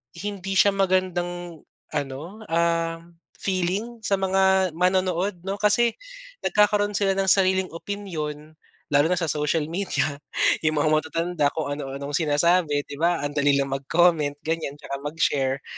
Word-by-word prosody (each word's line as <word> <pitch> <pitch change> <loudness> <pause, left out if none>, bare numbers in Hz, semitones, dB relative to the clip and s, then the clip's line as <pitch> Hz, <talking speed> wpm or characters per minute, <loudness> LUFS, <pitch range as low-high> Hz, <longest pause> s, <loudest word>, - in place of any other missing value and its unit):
hindi 195 -1 -4
siya 200 +1 +5
magandang 175 -3 -1 0.3
ano, 135 -2 -3 0.3
ah, 165 0 0 0.4
feeling 200 +5 -2
sa 200 -3 +1
mga 190 -1 +3
manonood 185 +1 +1
'no. 195 - -1
Kasi 220 +3 +2 0.5
nagkakaroon 210 0 +3
sila 195 -1 +2
ng 195 - +1
sariling 190 -1 +3
opinyon, 160 -5 -6 0.4
lalo 145 0 +4
na 180 - +1
sa 170 -3 -1
social 150 +1 0
media, 170 -5 -1 0.5
yung 155 0 +2
mga 155 +1 +2 0.2
matatanda 165 -2 0
kung 155 -3 -2
ano 140 -2 -5
anong 140 +1 -5
sinasabi, 155 -1 +2
di 145 0 -10
ba? 170 -2 +1
Ang 145 - -2
dali 145 -1 +3
lang 140 -1 0
mag-comment 150 +2 +2
ganyan, 160 -3 -2
tsaka 140 -1 -6
mag-share. 140 -3 0
170 Hz, 140 wpm, -24 LUFS, 150-190 Hz, 0.5 s, siya